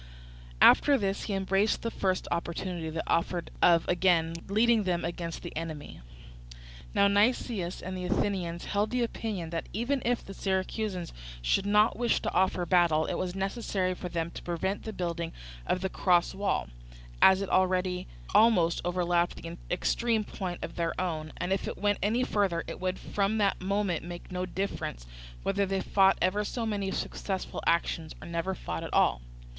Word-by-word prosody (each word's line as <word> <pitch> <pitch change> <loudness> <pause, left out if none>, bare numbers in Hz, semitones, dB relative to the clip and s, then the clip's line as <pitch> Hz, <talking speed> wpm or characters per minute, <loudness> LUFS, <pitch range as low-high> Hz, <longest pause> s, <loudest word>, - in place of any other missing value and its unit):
After 285 -1 +7
this 195 -3 -2
he 205 - -2
embraced 195 +2 +1
the 230 - -1
first 190 -3 -1
opportunity 170 0 -3
that 160 +1 -3
offered 170 +1 0
of 170 -2 +5
again 175 -2 +3
leading 220 +3 +4
them 180 -3 -1
against 170 -1 -4
the - - -7
enemy. 155 - -6 0.9
Now 200 - +5
Nicias 205 -3 +1
and 185 0 -4
the 180 -1 -4
Athenians 180 -3 -1
held 205 +1 0
the 250 -1 0
opinion 205 -7 -4
that 165 -1 -4
even 245 +6 0
if 245 0 0
the 195 - -8
Syracusans 190 -1 -2 0.3
should 195 - +1
not 210 +1 +4
wish 240 -1 +2
to - - -2
offer 185 -1 +2
battle, 170 -3 +3
it - - -2
was 185 0 -3
necessary 195 -2 -1
for 180 0 -6
them 170 -1 -2
to - - -8
prevent 175 +3 -2
the 220 - -3
building 170 -4 -3 0.3
of 185 - 0
the 190 - 0
cross 175 -2 +2
wall, 195 - -1 0.5
as 190 +1 +7
it 195 - -5
already 185 -1 +1 0.3
almost 190 -7 +4
overlapped 175 -1 +1
the 165 0 -6
extreme 225 +4 +1
point 185 -3 -5
of - - -6
their 170 -1 -1
own, 160 -4 -2
and 180 +2 0
if 195 - -2
it - - -4
went 205 0 +1
any 225 +5 +2
further 195 -8 +1
it - - -7
would 185 0 -1
from 200 +2 -1
that 200 -3 +1
moment 195 -2 0
make 175 +2 -8
no 180 0 -2
difference 180 - -4 0.4
whether 200 0 +1
they 195 0 0
fought 195 0 +4
ever 195 +3 +2
so 230 +2 -3
many 205 -3 -1
successful 190 0 -3
actions, 165 -1 0
or - - -10
never 170 +3 -2
fought 85 - -5
at - - -6
all. - - +3
185 Hz, 175 wpm, -29 LUFS, 170-200 Hz, 0.9 s, After